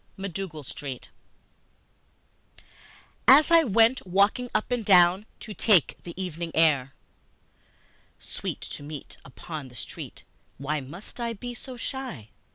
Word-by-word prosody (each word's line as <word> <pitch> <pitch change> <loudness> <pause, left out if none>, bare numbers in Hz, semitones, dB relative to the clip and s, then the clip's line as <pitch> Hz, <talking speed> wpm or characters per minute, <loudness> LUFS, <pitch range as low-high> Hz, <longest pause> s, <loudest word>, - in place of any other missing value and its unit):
MacDougal 190 -5 -5
Street 130 -1 -7 2.2
AS 295 +5 +8
I 335 -1 +7
went 230 -2 +3
walking 200 +7 +2
up 215 +3 -1
and 245 -2 0
down 185 +1 +5
to 215 - -7
take 200 -7 +4
the 175 +1 -9
evening 170 -2 -4
air, 140 -5 +3 1.2
(Sweet - - -6
to - - -8
meet 145 -1 -8
upon 150 +2 -8
the 125 - -15
street, 100 -5 -8 0.3
why 150 +2 -2
must 170 - -9
I 235 -1 -2
be 245 +3 -7
so 250 +1 -9
shy?) 245 - -5
185 Hz, 125 wpm, -27 LUFS, 150-230 Hz, 2.2 s, AS